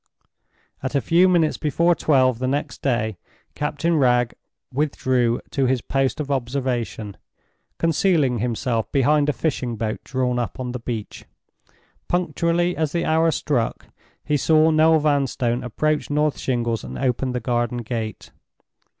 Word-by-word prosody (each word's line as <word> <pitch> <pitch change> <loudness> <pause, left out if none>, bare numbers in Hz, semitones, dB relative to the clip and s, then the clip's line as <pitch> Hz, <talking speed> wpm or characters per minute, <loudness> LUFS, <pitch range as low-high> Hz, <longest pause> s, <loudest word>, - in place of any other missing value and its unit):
At 130 +2 -3
a - - +4
few 175 +6 +4
minutes 165 -4 +2
before 170 +3 +2
twelve 130 -7 +2
the 130 - -1
next 140 -1 -2
day 110 -7 -1 0.3
Captain 150 +3 -1
Wragge 125 -3 +3 0.4
withdrew 130 -4 +1
to 135 -2 +1
his 130 -1 +1
post 135 +1 -1
of 145 -2 -3
observation, 120 -5 -2 0.6
concealing 160 - +2
himself 115 0 -1
behind 145 +2 +3
a - - +4
fishing 130 -7 -2
boat 110 0 -3
drawn 125 -2 -1
up 120 - -4
on 125 -1 -3
the 125 - -5
beach. 115 -3 -6 0.8
Punctually 175 0 0
as 155 -2 -1
the 170 -1 0
hour 160 +1 +3
struck, 140 -7 -1 0.4
he 150 0 +1
saw 160 +2 +4
Noel 160 +1 +5
Vanstone 135 -5 0
approach 150 +5 -1
North 150 0 +1
Shingles 120 -3 -1
and 65 0 -7
open 130 0 0
the 125 - -1
garden 120 0 -1
gate. 110 -2 -5
130 Hz, 140 wpm, -22 LUFS, 120-155 Hz, 0.8 s, Noel